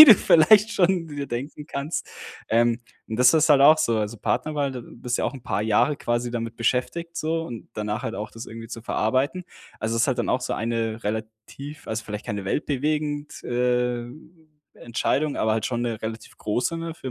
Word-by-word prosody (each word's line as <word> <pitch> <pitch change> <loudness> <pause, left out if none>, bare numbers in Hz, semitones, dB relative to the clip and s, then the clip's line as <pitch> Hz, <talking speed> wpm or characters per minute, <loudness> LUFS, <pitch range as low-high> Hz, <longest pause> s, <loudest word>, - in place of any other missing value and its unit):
wie - - +16
du 230 - +11
vielleicht 205 +5 +6
schon 180 -2 +2
dir 145 -2 -5
denken 140 +5 -5
kannst. 145 +2 -3 0.4
Ähm, 115 +1 +3 0.3
und 110 - -3
das 125 +2 +6
ist 160 0 +4
halt 140 -2 +7
auch 150 +3 +8
so, 135 -8 +1
also, 105 +2 -2
Partnerwahl 145 +5 -1
da 125 - -5
bist 120 +1 -4
du - - 0
ja - - +2
auch - - -10
'n 130 - -9
paar 120 - -1
Jahre 110 +7 +2
quasi 120 +1 -1
damit 115 -1 -4
beschäftigt 165 +8 -1
so 165 +1 -1
und 120 -8 -8
danach 105 +3 -3
halt 115 - -3
auch 105 -1 -5
das 115 +1 -9
irgendwie 115 0 -9
zu 115 0 -7
verarbeiten. 130 +12 0 0.4
Also, 110 +1 -1
ist 115 - +3
halt - - +1
dann - - 0
auch - - +2
so - - -2
eine 115 0 -2
relativ 110 +7 -6
also, 110 +1 -3
vielleicht 105 0 -5
keine 100 -2 -4
weltbewegend, 150 +4 -2
äh, 125 0 0 0.7
Entscheidung, 140 +5 -1
aber 110 - +1
halt 110 0 0
schon 120 -1 -2
'ne 115 -3 -2
relativ 110 0 -7
große, 120 +10 -1
ne, 165 -1 -5
für 135 -5 -6
125 Hz, 205 wpm, -24 LUFS, 115-150 Hz, 0.7 s, wie